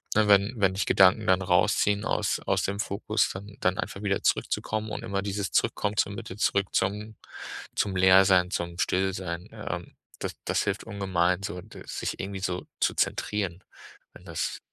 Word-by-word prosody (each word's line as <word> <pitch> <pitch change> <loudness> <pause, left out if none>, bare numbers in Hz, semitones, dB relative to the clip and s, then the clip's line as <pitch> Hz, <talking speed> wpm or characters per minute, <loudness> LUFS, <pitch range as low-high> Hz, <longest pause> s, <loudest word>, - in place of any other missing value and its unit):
ne, 110 0 +4
wenn 100 +3 +5
wenn 95 -3 +3
dich 100 - 0
Gedanken 95 +3 +5
dann 95 0 +4
rausziehen 100 +3 +2
aus - - 0
aus - - +1
dem 100 +1 -2
Fokus, 100 -1 0
dann 100 +2 -9
dann 90 0 +2
einfach 100 - -4
wieder 100 -1 0
zurückzukommen 110 0 0
und 110 - -5
immer 100 -3 -2
dieses 100 -1 -2
zurückkommen, 105 0 0
zur 100 - +2
Mitte 95 -1 -7
zurück, 100 -2 +2
zum 105 +3 -1 0.6
zum 100 -2 0
Leersein, 95 0 +6
zum 85 -2 -3
Stillsein. 90 -2 -1
Ähm, - - -6 0.2
das - - -3
das - - +1
hilft 105 +1 -2
ungemein 95 -3 0
so, 90 -1 -4
d 110 +5 -12
sich - - -4
irgendwie 100 0 -4
so 90 -1 -2
zu - - +1
zentrieren, 95 -3 -1 0.5
wenn 90 - -15
das 85 -3 -3
95 Hz, 170 wpm, -27 LUFS, 95-100 Hz, 0.6 s, Leersein